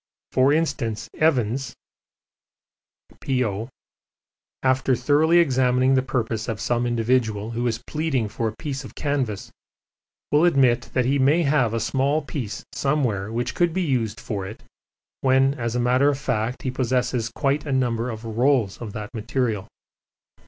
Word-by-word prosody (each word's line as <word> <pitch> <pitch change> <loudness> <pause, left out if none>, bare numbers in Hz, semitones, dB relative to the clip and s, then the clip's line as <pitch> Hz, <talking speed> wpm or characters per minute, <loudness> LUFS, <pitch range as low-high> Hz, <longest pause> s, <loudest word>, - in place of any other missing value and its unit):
For 130 +2 +4
instance, 115 -8 -1
Evans 135 -4 +1 1.4
(P.O.), 115 -4 -1 0.9
after 130 0 +2
thoroughly 150 +7 +3
examining 130 -4 +3
the 130 - +4
purpose 115 -4 -2
of 110 -2 -3
some 120 0 0
individual 115 -2 0
who 120 +1 -1
is 115 -1 -2
pleading 150 -7 -1
for 115 +2 -2
a 110 - -4
piece 140 -2 -4
of 130 - -11
canvas, 135 -8 -2 0.8
will 150 +2 +4
admit 130 -7 +3
that 125 -2 +2
he 140 +2 +2
may 145 +6 +4
have 135 -6 +2
a - - 0
small 135 +6 0
piece 130 -7 -5
somewhere 120 -9 0
which 120 +2 -2
could 175 -2 +1
be 185 +1 0
used 125 -8 -1
for 100 -4 -4
it, 110 - -10 0.6
when, 135 +1 +3
as 115 -4 -3
a - - +1
matter 125 +4 +3
of 140 - 0
fact, 125 -2 -2
he 130 - -1
possesses 125 -2 0
quite 145 +2 0
a - - -2
number 125 -2 0
of 110 0 -7
rolls 115 -2 +1
of 110 -4 -6
that 105 -1 -7
material. 115 -3 -2
125 Hz, 150 wpm, -23 LUFS, 115-140 Hz, 1.4 s, For